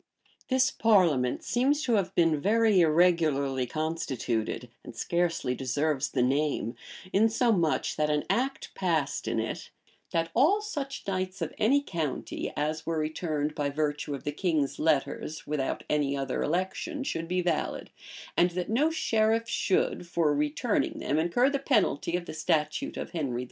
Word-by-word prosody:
This 260 0 +3
parliament 170 - +3
seems 275 +5 +1
to 245 - +1
have 200 -4 0
been 165 -4 +3
very 220 0 +4
irregularly 155 -6 +3
constituted, 130 -7 -2
and 115 - -10
scarcely 170 -3 0
deserves 140 +3 -1
the 125 - +1
name; 140 -2 0 0.4
insomuch, 220 -5 +2
that 150 0 +1
an 150 -1 +1
act 270 +3 -1
passed 160 -6 -1
in - - 0
it, - - -4 0.4
"that 165 0 -1
all 315 - +4
such 290 -10 -5
knights 185 0 -2
of 165 - -3
any 275 +7 +3
county, 160 - -3
as 155 +2 -1
were 165 0 -2
returned 155 -1 -2
by 145 -1 -1
virtue 145 0 -2
of 135 - -9
the 145 - -2
king's 155 -3 -1
letters, 155 0 0
without 145 -3 -2
any 140 -2 0
other 135 -1 -2
election, 185 - -2
should 165 -11 -3
be 180 +1 0
valid; 170 -3 -2 0.4
and 175 - +4
that 180 +3 -2
no 285 +8 +3
sheriff 225 -7 +1
should, 185 -5 0
for 165 -3 +1
returning 150 +10 0
them, 145 +3 0
incur 175 +11 +2
the 280 0 0
penalty 210 - +1
of 175 - -6
the - - -7
statute 155 - -1
of - - -5
Henry 145 -8 -2
IV." - - -2
165 Hz, 155 wpm, -28 LUFS, 150-215 Hz, 0.4 s, very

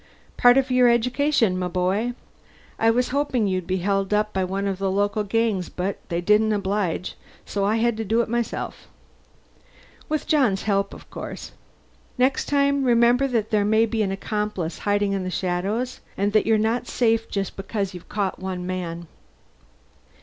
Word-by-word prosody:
"Part 245 +1 +6
of 265 -1 +1
your 250 -1 +5
education, 240 -3 +2
m'boy. 185 +6 -1 0.6
I 225 - +4
was 245 +2 +2
hoping 275 -4 0
you'd 185 -3 -1
be 185 - 0
held 195 +2 0
up 210 0 0
by 190 - 0
one 195 +2 -2
of 195 -1 -2
the 195 -1 0
local 205 +2 0
gangs, 210 -3 0
but 185 +2 -3
they 170 0 -1
didn't 210 +4 +3
oblige, 195 -3 -1 0.3
so 200 -1 -1
I 210 +2 +2
had 230 0 +1
to 225 - -2
do 220 +3 +1
it - - -2
myself. 235 0 -3 1.2
With 310 -1 -1
John's 255 -11 +2
help, 200 -1 0
of - - -14
course. - - -7 0.7
Next 255 +1 +2
time 280 -1 +2
remember 240 +2 +4
that 230 -5 -1
there 210 -2 +3
may 220 +2 +3
be 225 -1 -1
an 195 -2 0
accomplice 200 -4 -3
hiding 205 0 +1
in 195 -1 -1
the 185 - -3
shadows, 195 +8 -2 0.2
and 205 +1 0
that 215 - +3
you're 220 -1 +4
not 225 +3 0
safe 225 -2 +1
just 195 -2 -3
because 195 0 -3
you've 180 -1 -11
caught 200 -2 -2
one 185 -1 -4
man." 175 -2 -4
210 Hz, 170 wpm, -23 LUFS, 190-235 Hz, 1.2 s, Part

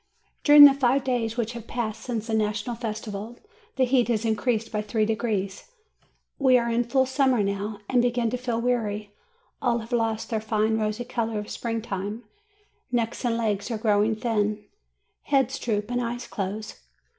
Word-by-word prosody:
During 290 0 +9
the 280 - +8
five 270 0 +2
days 235 -3 -1
which 235 0 -1
have 235 -1 -9
passed 230 -2 -3
since 230 -4 -3
the 225 - -4
National 215 +2 -1
Festival, 220 -1 -5 0.4
the 260 - +3
heat 250 -1 +3
has 230 -2 0
increased 225 0 0
by 210 -2 -1
three 215 +1 0
degrees. 215 - -2 0.7
We 260 -3 +5
are 235 -1 0
in 235 +1 +1
full 265 +2 +2
summer 260 -4 +2
now, 200 +1 -3
and 250 -2 +3
begin 240 -2 +1
to 250 - -1
feel 245 -2 -2
weary; 215 -4 -1 0.5
all 245 -3 +2
have 230 +1 -8
lost 225 -2 -1
their 220 -1 0
fine 220 0 +1
rosy 215 +2 -2
color 230 -3 -2
of 210 0 -5
spring 230 -2 -3
time; 205 +2 -4 0.7
necks 235 0 -1
and 235 -2 +1
legs 210 -2 -1
are 230 - -2
growing 215 0 +2
thin, 210 -2 -1 0.6
heads 270 -2 +1
droop 210 -1 -2
and 245 0 0
eyes 240 +1 -4
close. 205 +2 -5
230 Hz, 175 wpm, -25 LUFS, 215-245 Hz, 0.7 s, During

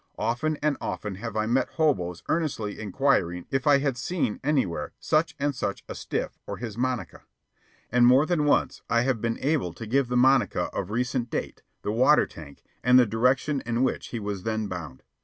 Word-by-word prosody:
Often 120 +8 -1
and 150 -2 +2
often 100 +1 -4
have 110 0 -5
I 110 - +1
met 125 +3 +1
hoboes 90 - 0
earnestly 140 -11 -1
inquiring 100 -6 0
if 135 0 0
I 145 -1 +7
had 140 -3 -1
seen 145 -5 -2
anywhere 130 - 0
such 155 +2 +1
and 145 +1 0
such 100 -6 -3
a - - -5
"stiff" - - -4
or - - -4
his 115 -3 -6
monica. 125 0 -2 0.7
And 120 0 +5
more 130 +4 +6
than 155 -3 +1
once 145 - +1
I 115 0 +3
have 125 -4 0
been 115 -1 -1
able 135 - 0
to 115 - -8
give 130 +4 +1
the 125 0 0
monica 130 +1 +3
of 90 - -3
recent 125 +2 -1
date, - - -4 0.2
the 105 - -1
water 130 +7 +5
tank, 75 -4 -12 0.2
and 125 +1 +6
the 125 - +7
direction 125 +6 +1
in 120 +2 0
which 130 - -1
he 120 - -5
was 100 -2 -4
then 110 +1 -2
bound. 85 -9 -7
125 Hz, 195 wpm, -26 LUFS, 105-140 Hz, 0.7 s, I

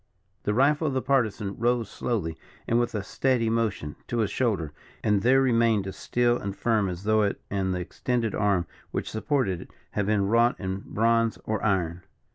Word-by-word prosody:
The 105 - +1
rifle 145 +5 +3
of 135 - -1
the 130 - +1
Partisan 110 -7 0
rose 120 -1 +1
slowly, 100 -8 -2 0.3
and, 115 - +3
with 120 -2 -1
a 105 - -2
steady 120 +1 +1
motion, 110 -10 -1
to 120 - -2
his 110 -3 +1
shoulder, 95 - 0 0.3
and 105 -2 +2
there 130 +4 +4
remained 115 -5 +3
as 95 - -5
still 120 0 +1
and 100 0 -4
firm 110 -4 +1
as 90 +1 -6
though 110 +1 +3
it 100 -1 0
and 95 -1 0
the 90 -1 -1
extended 115 +4 -2
arm 100 -4 +1 0.2
which - - -3
supported 110 - 0
it, - - -12 0.2
had 105 -2 -1
been 105 -2 +2
wrought 115 +4 +3
in 95 -1 -3
bronze 115 0 +2
or 110 -2 -2
iron. 90 -4 0
110 Hz, 190 wpm, -26 LUFS, 95-120 Hz, 0.3 s, there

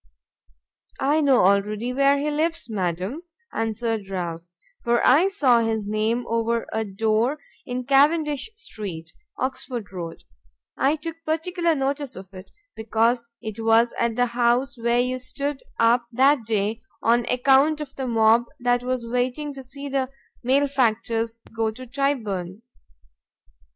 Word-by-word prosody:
"I 295 +3 +2
know 270 -9 +4
already 210 +5 +1
where 275 +1 +4
he 295 +2 -1
lives, 325 0 -1
madam," 190 - -2 0.3
answered 225 -2 -2
Ralph, 175 -3 -3 0.4
"for 235 0 +2
I 305 +9 +6
saw 280 -12 +3
his 225 -2 -1
name 215 +3 0
over 230 0 0
a 220 - 0
door 220 +6 0 0.3
in 250 0 -3
Cavendish 290 - +3
street, 195 - -7 0.3
Oxford 255 -4 -4
road; 170 -3 -7 0.5
I 275 +3 +2
took 325 +2 -6
particular 330 +1 0
notice 275 0 -2
of 190 +1 -11
it, 185 0 -11 0.3
because 230 +2 +1 0.2
it 220 +1 -5
was 225 +1 +4
at 235 -1 +1
the 245 - +3
house 245 +3 +1
where 235 0 +1
you 250 +1 0
stood 280 +2 -3 0.2
up 235 +1 +3
that 265 0 +4
day 215 +1 -1 0.2
on 235 +1 +3
account 270 +4 +4
of 285 -3 -7
the 265 -1 -3
mob 225 0 +4
that 245 0 +2
was 250 -1 -2
waiting 250 +5 -2
to 270 - -8
see 280 +2 -8
the 270 -2 -1 0.3
malefactors 235 -4 +1
go 225 -1 +1
to 255 +4 -9
Tyburn." 230 -8 -2
240 Hz, 140 wpm, -24 LUFS, 220-275 Hz, 0.5 s, I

